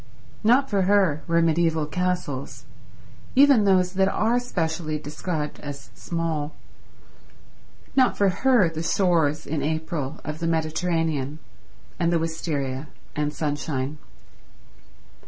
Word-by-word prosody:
Not 250 +5 +4
for 200 -6 +1
her 190 -7 +3
were 170 0 +3
mediaeval 165 -1 +2
castles, 180 -5 -3 0.7
even 270 -5 +6
those 185 -2 +3
that 190 0 +3
are 225 +5 +2
specially 160 -9 -2
described 150 +1 -4
as 140 -1 -8
small. 160 -3 -3 1.4
Not 260 -2 +4
for 200 -1 +4
her 240 0 +3
the 160 -1 -4
shores 165 -4 +2
in 150 -1 -2
April 155 -1 -3
of 155 0 -5
the 165 - -1
Mediterranean, 160 -3 -1 0.6
and 170 -1 +2
the 170 - +3
wisteria 150 -4 -3 0.3
and 150 0 0
sunshine. 145 -2 -3
165 Hz, 115 wpm, -24 LUFS, 150-180 Hz, 1.4 s, even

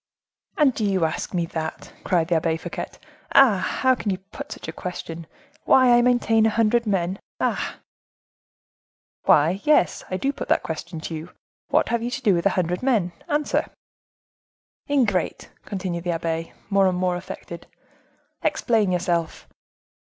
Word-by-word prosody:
"And 290 -4 +4
do 220 - -3
you 190 -4 +2
ask 160 - -3
me 175 -3 0
that?" 160 -1 -5
cried 170 -3 +1
the 175 - +3
Abbe 160 0 0
Fouquet; - - -5 0.5
"ah! 250 -8 +7
how 260 +7 +2
can 230 -4 -3
you 190 - 0
put 205 +10 -10
such - - -7
a - - -3
question,—why 180 - 0
I 240 - +5
maintain 240 -3 +3
a - - +3
hundred 230 +1 +2
men? 190 -1 0 0.2
Ah!" - - -1 1.5
"Why, 165 +6 +4
yes, 300 -11 +3
I 185 - -1
do 275 +7 -1
put - - -6
that - - +2
question 160 0 -5
to 165 - -5
you. 160 +2 -6 0.4
What - - +2
have 235 -1 0
you 240 - -2
to 265 +2 -4
do 205 -5 +4
with 170 +2 +2
a 195 - -1
hundred 180 0 0
men?—answer." 255 - 0 1.2
"Ingrate!" 230 -11 0
continued 180 -4 -4
the 175 - 0
abbe, 165 0 -3 0.2
more 195 -1 +4
and 180 -1 0
more 180 0 +1
affected. 175 - -8 0.7
"Explain 220 -6 +1
yourself." 175 -2 -1
185 Hz, 155 wpm, -23 LUFS, 170-235 Hz, 1.5 s, ah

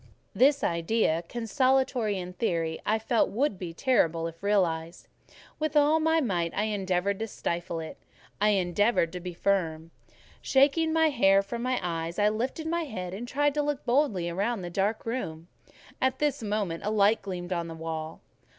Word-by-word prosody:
This 280 +2 +4
idea, 170 0 +1
consolatory 245 -2 +1
in 180 0 -6
theory, 165 -6 -1
I 215 - +3
felt 225 +1 +1
would 225 -3 -1
be 175 -3 -5
terrible 165 -6 +1
if 165 0 -7
realised: 175 -5 0 0.5
with 310 -1 0
all 300 +2 +4
my 320 +1 +3
might 175 - 0
I 205 - +1
endeavoured 195 -2 -1
to 225 - -2
stifle 170 -4 -3
it—I 195 +5 -4
endeavoured 190 -1 +2
to 180 - -4
be 180 -1 -7
firm. 165 -4 -1 0.5
Shaking 290 +4 +3
my 320 0 +4
hair 195 -8 +4
from 235 +4 -5
my 255 +1 0
eyes, 165 -1 -3
I 210 0 +4
lifted 250 +9 -3
my 335 +1 -1
head 185 -9 -6
and 230 +5 -6
tried 290 +3 +1
to 300 - +1
look 290 -2 -2
boldly 235 - +1
round 200 +3 -1
the 175 - -6
dark 200 +4 -1
room; 170 -9 -4 0.5
at 260 0 +1
this 290 -3 0
moment 205 -6 -2
a 210 - -1
light 215 +1 +3
gleamed 185 -2 -4
on 170 -1 -2
the 165 - -7
wall. 160 -1 -5
205 Hz, 170 wpm, -28 LUFS, 175-255 Hz, 0.5 s, This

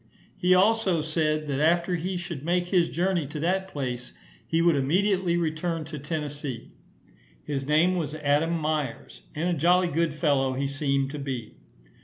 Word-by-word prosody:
He 180 +1 +3
also 190 -4 +3
said, 155 -1 0
that 140 -1 -1
after 170 +3 +2
he 180 +2 -2
should 170 -5 -6
make 175 +2 0
his 180 -3 +3
journey 175 -3 0
to 150 +2 -6
that 190 +3 0
place, 125 -6 -5 0.3
he 165 - +1
would 170 -1 +4
immediately 180 +5 +1
return 165 0 -2
to 155 -1 -7
Tennessee. 145 -4 -5 0.7
His 140 -2 -3
name 165 +5 +3
was 155 -3 -2
Adam 150 +3 +1
Myers, 155 -5 -3
and 160 +3 -1
a 180 - +1
jolly 175 +3 +3
good 165 -1 0
fellow 140 -4 +1
he 135 +2 -2
seemed 140 -1 0
to 150 - -6
be. 130 -5 -5
155 Hz, 165 wpm, -26 LUFS, 145-175 Hz, 0.7 s, would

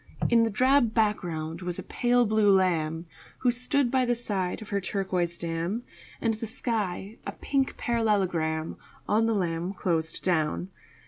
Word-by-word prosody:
In 235 -1 +5
the 230 - +3
drab 255 +1 +3
background 175 -7 0
was 180 -1 -4
a - - -5
pale 245 0 +2
blue 215 -1 +4
lamb 165 -4 +2 0.4
Who 250 - +4
stood 250 +1 0
by 260 -1 +3
the 245 -1 +1
side 195 -6 -2
of 215 - -10
her 200 -1 0
turquoise 185 -3 -1
dam, 170 +7 -2 0.4
And 225 -1 +1
the 220 +1 -4
sky 215 -3 -3
a - - -3
pink 270 -1 -1
parallelogram 185 -9 0 0.3
On 225 +2 +3
the 225 - +1
lamb 175 -1 -1
closed 165 -4 -2
down. 175 +1 0
200 Hz, 155 wpm, -27 LUFS, 170-230 Hz, 0.4 s, In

